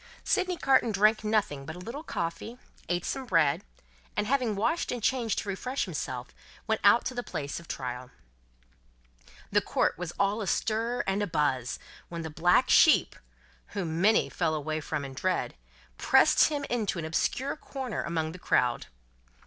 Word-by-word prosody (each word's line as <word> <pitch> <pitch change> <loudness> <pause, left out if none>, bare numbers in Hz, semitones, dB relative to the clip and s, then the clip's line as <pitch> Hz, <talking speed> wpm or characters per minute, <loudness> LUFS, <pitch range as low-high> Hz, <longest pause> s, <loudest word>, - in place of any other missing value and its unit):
Sydney 365 -1 +1
Carton 265 -6 +3
drank 215 +2 +3
nothing 210 -10 0
but 160 +4 -7
a - - -9
little 235 +11 -6
coffee, 220 - -4 0.3
ate 175 0 -1
some 265 -1 -3
bread, 160 -8 +2 0.5
and, - - +1
having 245 -3 +1
washed 320 +12 0
and 245 - -2
changed 240 -4 +1
to - - -3
refresh 250 +8 -2
himself, 130 -8 -5 0.3
went 220 0 0
out 205 +4 +6
to 255 - -2
the 245 - -3
place 145 - -5
of 170 - -14
trial. 125 -1 -5 1.4
The - - +4
court - - 0
was 180 -2 -4
all 200 +2 +1
astir 225 +4 0
and 195 +1 0
a 205 - 0
buzz, 145 -6 0 0.3
when 170 -1 -5
the 160 - -6
black 175 +11 +3
sheep 315 - +5 0.6
whom 165 -3 -2
many 215 +3 +4
fell 160 -3 -1
away 155 +1 -3
from 150 -1 -3
in 135 - -8
dread 185 +7 -1 0.5
pressed - - +5
him 290 -2 -3
into 220 -6 -1
an 165 - -3
obscure 255 - -1
corner 265 -5 -5
among 160 -2 -2
the 180 - -10
crowd. 125 -7 +1
195 Hz, 165 wpm, -28 LUFS, 160-240 Hz, 1.4 s, out